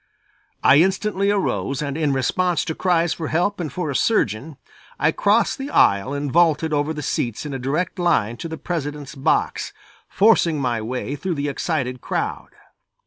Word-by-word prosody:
I 140 - +7
instantly 195 +3 +2
arose 190 -9 -1
and 140 -1 -3
in 155 -2 +1
response 170 +5 0
to 160 - -2
cries 170 -1 +1
for 160 - -5
help 180 +6 0
and 160 -5 -3
for 165 -1 -3
a - - -5
surgeon, 140 - 0 0.4
I 155 - +3
crossed 210 +10 +2
the 270 +1 -4
aisle 100 - +3
and 140 -1 -3
vaulted 160 -1 +3
over 145 +1 0
the 150 -2 -5
seats 120 0 -2
in 145 - -5
a 135 - -4
direct 155 +9 -2
line 120 -10 +1
to 165 - -5
the 160 - -5
President's 150 -5 -4
box, 135 -2 0 0.4
forcing 190 -7 +3
my 120 -4 -1
way 125 +5 -4
through 175 +4 -3
the 145 0 -2
excited 130 -4 -2
crowd. - - -3
155 Hz, 175 wpm, -22 LUFS, 135-175 Hz, 0.4 s, I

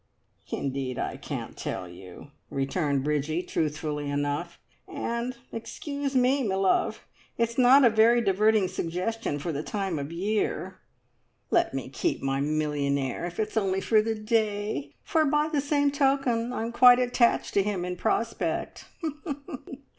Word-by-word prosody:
"Indeed, 135 -2 -3
I - - -2
can't - - -6
tell 90 - -4
you!" 90 +9 -12 0.2
returned 140 0 0
Bridgie, 150 +3 0
truthfully 150 -2 -2
enough. 145 +4 -2 0.3
"And 235 +1 -3
excuse 280 +4 -4
me, 260 +2 +3
me 200 -6 0
love, 190 0 +1 0.3
it's 230 0 0
not 260 +2 +7
a - - +8
very 225 +2 +5
diverting 210 -1 +3
suggestion 180 +1 -2
for 155 +4 -3
the 145 -1 -3
time 195 -2 -2
of 140 +2 -5
year! 200 +6 -2 0.7
Let - - +2
me - - -3
keep 345 - -1
my 135 0 0
millionaire, 145 -2 -1
if 175 +3 -8
it's 215 0 -2
only 190 -3 +1
for 215 +2 +3
the 225 +1 -1
day, 210 - -1
for 320 - +2
by 300 +1 +2
the 300 -3 +1
same 285 0 +2
token 270 -4 +1
I'm 230 -2 -3
quite 245 +1 +8
attached 245 -1 +2
to 200 - +4
him 195 -3 -2
in 180 0 -3
prospect! 230 +5 -2
205 Hz, 145 wpm, -27 LUFS, 150-235 Hz, 0.7 s, a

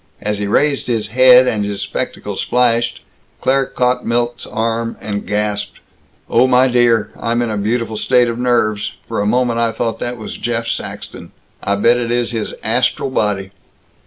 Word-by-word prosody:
As 105 -1 -2
he 105 - -2
raised 140 +6 +1
his 110 -4 -1
head, 130 +2 +6
and 105 -4 0
his 100 -1 -3
spectacles - - -4
flashed, 120 -1 +1 0.4
Claire 135 0 +1
caught 125 0 0
Milt's 120 +1 -1
arm 115 +1 -2
and 100 -1 -5
gasped, 105 0 -2 0.5
"Oh, 125 +2 +4
my 130 0 +4
dear, 120 -4 +2
I'm 115 0 0
in 115 - -2
a - - -2
beautiful 110 +1 -1
state 125 +2 +3
of 115 0 -3
nerves. 110 -4 0
For - - -2
a 105 - 0
moment 120 +1 +1
I 115 -1 +2
thought 115 0 -3
that 120 0 -3
was 110 - -7
Jeff 115 -1 -2
Saxton. - - -6 0.3
I 100 - 0
bet 115 +4 +3
it 120 -1 -2
is 120 0 0
his 115 -3 -3
astral 135 - 0
body!" 100 -5 -1
115 Hz, 175 wpm, -17 LUFS, 105-125 Hz, 0.5 s, head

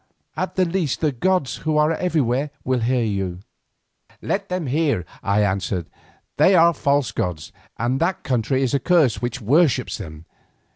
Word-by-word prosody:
At - - -3
the 185 - +3
least 170 -5 -1
the 155 -2 +2
gods, 180 +2 0
who 155 -1 -1
are 150 +1 +3
everywhere, 150 -6 0
will 130 0 0
hear 120 +1 +1
you." 95 -4 -2 0.8
"Let 200 0 -3
them 180 -2 -2
hear," 140 - 0 0.2
I 100 0 +1
answered. 95 -3 -1 0.5
"They 190 - +5
are 170 0 +6
false 140 -3 +1
gods 85 -4 -3 0.3
and 125 +3 0
that 170 +3 -1
country 130 +2 0
is 130 - -1
accursed 140 -2 +2
which 120 +1 -3
worships 145 - +2
them. 80 +1 -9
135 Hz, 155 wpm, -22 LUFS, 115-165 Hz, 0.8 s, are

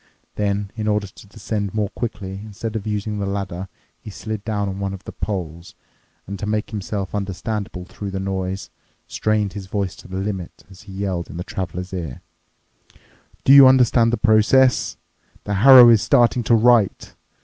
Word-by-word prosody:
Then, 100 -1 -2
in 110 -1 -4
order 105 -1 +1
to 100 +1 -14
descend 100 0 -4
more 105 -2 0
quickly, 100 -5 -6
instead 110 +1 -6
of 110 -1 -4
using 105 0 -3
the 100 - -2
ladder, 95 -2 -4 0.3
he - - -10
slid 110 0 -6
down 105 -2 -2
on 95 0 -5
one 100 0 -3
of 95 - -13
the - - -8
poles 85 -4 -5 0.5
and, 100 +1 -7
to 105 - -4
make 105 +1 -2
himself 100 -2 -4
understandable 100 -1 -4
through 100 +2 -7
the 95 0 -4
noise, 95 0 -4 0.3
strained 105 -2 -1
his 100 -2 -7
voice 100 -2 -3
to - - -13
the 95 0 -6
limit 95 -3 -5
as 95 - -14
he - - -8
yelled 95 -3 -3
in - - -8
the 90 - -4
traveler's 90 0 -6
ear, 80 -8 -6 1.2
"Do 135 - +6
you 140 -1 +10
understand 125 -3 +4
the 120 - 0
process? 110 +5 +3 0.5
The 105 - -3
harrow 125 +4 +9
is 115 -3 +5
starting 120 +1 +3
to 120 - +4
write. 115 -3 +2
100 Hz, 180 wpm, -21 LUFS, 95-110 Hz, 1.2 s, you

